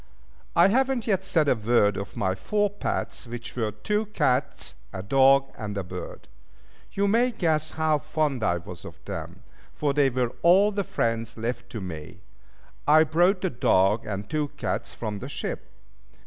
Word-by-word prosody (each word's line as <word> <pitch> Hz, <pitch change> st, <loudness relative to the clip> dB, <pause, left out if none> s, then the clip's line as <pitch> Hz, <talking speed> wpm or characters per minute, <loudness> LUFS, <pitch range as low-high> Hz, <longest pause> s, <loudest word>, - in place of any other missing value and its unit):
I 170 Hz, +3 st, +6 dB
have 260 Hz, +5 st, +3 dB
not 260 Hz, -4 st, -2 dB
yet 190 Hz, -4 st, +1 dB
said 165 Hz, -6 st, +2 dB
a -, -, +5 dB
word 110 Hz, -3 st, +2 dB
of 100 Hz, -, -6 dB
my 95 Hz, -1 st, +1 dB
four 205 Hz, -, 0 dB
pets, 205 Hz, -9 st, -3 dB
which 120 Hz, +1 st, -7 dB
were 110 Hz, -3 st, -1 dB
two 210 Hz, -, -2 dB
cats, 130 Hz, -10 st, 0 dB, 0.2 s
a 95 Hz, -, -6 dB
dog, 135 Hz, +4 st, +4 dB
and 105 Hz, -2 st, -5 dB
a 100 Hz, -, -1 dB
bird. 90 Hz, 0 st, -8 dB, 0.7 s
You 200 Hz, 0 st, +1 dB
may 235 Hz, +5 st, +3 dB
guess 160 Hz, -8 st, 0 dB
how 160 Hz, -1 st, +1 dB
fond 150 Hz, -5 st, -1 dB
I 85 Hz, -4 st, +2 dB
was 85 Hz, -1 st, -9 dB
of -, -, -9 dB
them, 85 Hz, +6 st, -7 dB, 0.3 s
for 145 Hz, -2 st, 0 dB
they 140 Hz, -1 st, +4 dB
were 125 Hz, -1 st, -1 dB
all 190 Hz, +5 st, +5 dB
the 200 Hz, -1 st, -1 dB
friends 115 Hz, -, -2 dB
left 120 Hz, +1 st, -4 dB
to 110 Hz, -, -4 dB
me. 80 Hz, -5 st, -8 dB, 0.7 s
I 155 Hz, +2 st, +7 dB
brought 175 Hz, +5 st, +2 dB
the 185 Hz, -, 0 dB
dog 105 Hz, 0 st, +2 dB
and 105 Hz, 0 st, -4 dB
two 150 Hz, -1 st, -1 dB
cats -, -, -3 dB
from 105 Hz, -3 st, -4 dB
the 130 Hz, -, -7 dB
ship. -, -, -5 dB
135 Hz, 175 wpm, -26 LUFS, 105-175 Hz, 0.7 s, I